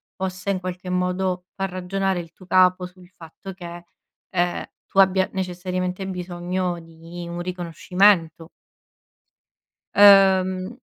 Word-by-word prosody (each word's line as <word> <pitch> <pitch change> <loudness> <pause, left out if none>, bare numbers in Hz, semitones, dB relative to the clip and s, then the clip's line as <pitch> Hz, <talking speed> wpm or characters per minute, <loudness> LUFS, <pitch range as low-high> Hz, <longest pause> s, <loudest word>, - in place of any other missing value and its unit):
possa 185 +1 -4
in 190 -2 0
qualche 185 0 -6
modo 180 0 -1
far 195 0 -3
ragionare 185 +1 -2
il 165 -1 -13
tuo 185 +1 -18
capo 185 0 +4
sul 180 -1 -18
fatto 180 +2 -11
che, 175 -1 -9 0.5
ehm, 175 -1 -1 0.2
tu 195 - -1
abbia 190 0 +3
necessariamente 185 0 -3
bisogno 180 -1 -3
di 165 +1 -10
un 170 0 -5
riconoscimento. 175 -1 +1 1.5
Ehm 190 0 +5
185 Hz, 115 wpm, -23 LUFS, 175-190 Hz, 1.5 s, Ehm